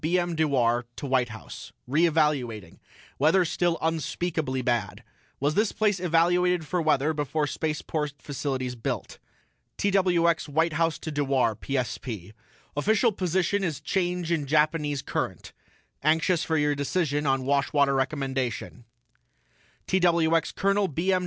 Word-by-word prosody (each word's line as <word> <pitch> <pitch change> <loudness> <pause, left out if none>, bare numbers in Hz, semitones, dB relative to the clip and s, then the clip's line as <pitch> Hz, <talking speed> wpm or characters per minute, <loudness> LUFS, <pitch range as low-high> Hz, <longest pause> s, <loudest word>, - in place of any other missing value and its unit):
B. 170 +4 +1
M. 175 -1 0
DEWAR 125 -7 +1
TO - - -6
WHITE 130 -3 +1
HOUSE: 110 0 -10
RE 155 +7 +3
EVALUATING 135 - 0 0.4
WEATHER 165 +6 +4
STILL 175 0 0
UNSPEAKABLY 160 -3 -1
BAD 120 -6 -1 0.4
WAS 145 +2 +1
THIS 210 +5 +2
PLACE 210 -3 +1
EVALUATED 175 0 +2
FOR 180 +3 -1
WEATHER 155 -1 +2
BEFORE 150 0 -1
SPACEPORT 150 -1 -3
FACILITIES 130 -2 -3
BUILT 120 - -4 0.6
TWX 180 -5 +2
WHITE 160 +3 +1
HOUSE 165 0 +1
TO 160 - -6
DEWAR 135 -6 +1
PSP: 115 -6 -4 0.4
OFFICIAL 220 - +2
POSITION 190 +1 0
IS 160 -6 -2
CHANGE 180 -3 -1
IN 155 -4 0
JAPANESE 150 -1 +1
CURRENT - - -4 0.5
ANXIOUS 160 +4 +2
FOR 160 - 0
YOUR 150 -1 +2
DECISION 145 0 -1
ON 135 -1 +1
WASHWATER 140 0 +2
RECOMMENDATION 135 -3 -2 1.0
TWX 170 -3 +2
COL. 200 0 +2
B. 175 +5 0
M. 185 - +3
155 Hz, 130 wpm, -26 LUFS, 135-175 Hz, 1.0 s, WEATHER